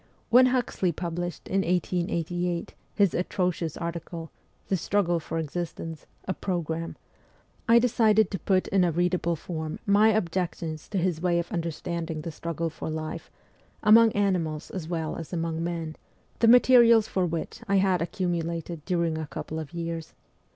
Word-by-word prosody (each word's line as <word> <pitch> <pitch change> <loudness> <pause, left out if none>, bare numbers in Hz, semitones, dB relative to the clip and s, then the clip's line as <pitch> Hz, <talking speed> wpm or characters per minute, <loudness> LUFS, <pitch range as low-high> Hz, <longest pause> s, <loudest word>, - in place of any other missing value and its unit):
When 255 +2 +8
Huxley 245 -8 0
published 175 -1 -4
in 195 +1 +1
1888 175 -1 -1 0.2
his 200 -4 +3
atro 180 0 0
cious 160 -2 -5
article, 170 -1 -5 0.2
' - - -38
The 195 - +2
Struggle 175 -1 +1
for 165 +1 -5
Existence: 165 0 -5 0.2
a 185 - 0
Program,' 165 -4 -3 0.7
I 230 - +8
decided 220 -3 +4
to 195 - -3
put 185 +1 +1
in 195 -2 +3
a 175 - +2
readable 175 0 +1
form 160 -1 -5
my 205 +2 +5
objections 170 -5 -2
to 200 - -2
his 175 -3 0
way 175 -1 +2
of 170 +4 -2
understanding 165 -2 -3
the 165 - -5
struggle 165 +1 -3
for 155 - -6
life, 155 0 -5 0.5
among 225 +1 +7
animals 175 -7 0
as 175 -5 -5
well 165 -2 -3
as 165 +1 -8
among 165 -1 -2
men, 165 -2 -3 0.4
the 230 - +4
materials 235 -2 +7
for 185 -4 0
which 165 +6 -4
I 200 - +2
had 190 -2 +3
accumulated 170 -2 -2
during 170 -3 0
a 155 - -4
couple 160 +2 -5
of 155 -3 -7
years. 165 -1 -5
175 Hz, 160 wpm, -27 LUFS, 165-190 Hz, 0.7 s, When